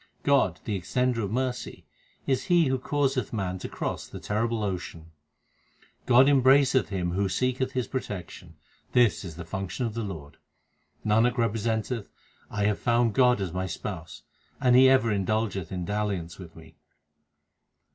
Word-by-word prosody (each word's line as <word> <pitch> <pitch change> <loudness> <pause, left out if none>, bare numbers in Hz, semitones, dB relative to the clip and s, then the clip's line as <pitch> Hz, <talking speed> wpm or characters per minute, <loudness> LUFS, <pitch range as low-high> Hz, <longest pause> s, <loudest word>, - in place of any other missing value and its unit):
God, 140 -1 +2
the 105 - -2
Extender 125 +5 0
of 100 -3 -2
mercy, 125 +1 -3 0.4
is 130 -1 0
He 175 -2 +4
who 130 0 0
causeth 135 -1 -1
man 95 -4 -3
to - - -6
cross - - -4
the - - -9
terrible 110 +1 -1
ocean. 85 -4 -5 1.0
God 130 +2 +6
embraceth 135 -1 +4
him 90 -3 -2
who 95 +2 0
seeketh 130 +4 -1
His 125 -3 -1
protection; 105 -9 -6 0.4
this 120 -8 +3
is 85 -5 -8
the 85 0 -8
function 95 +8 -4
of 115 - -3
the 115 - -3
Lord. 80 -9 -7 0.7
Nanak 115 +3 +3
representeth, 115 0 -1 0.4
I 105 - -2
have 105 -1 +1
found 120 -1 +2
God 125 -2 +4
as 90 -3 -3
my 95 +1 -2
Spouse, 85 -1 -7 0.4
and 125 -2 +4
He 130 +1 +8
ever 130 -4 +4
indulgeth 100 -2 -1
in 90 -2 -3
dalliance 100 -5 -3
with 85 -3 -11
me. 80 0 -15
110 Hz, 155 wpm, -27 LUFS, 95-125 Hz, 1.0 s, He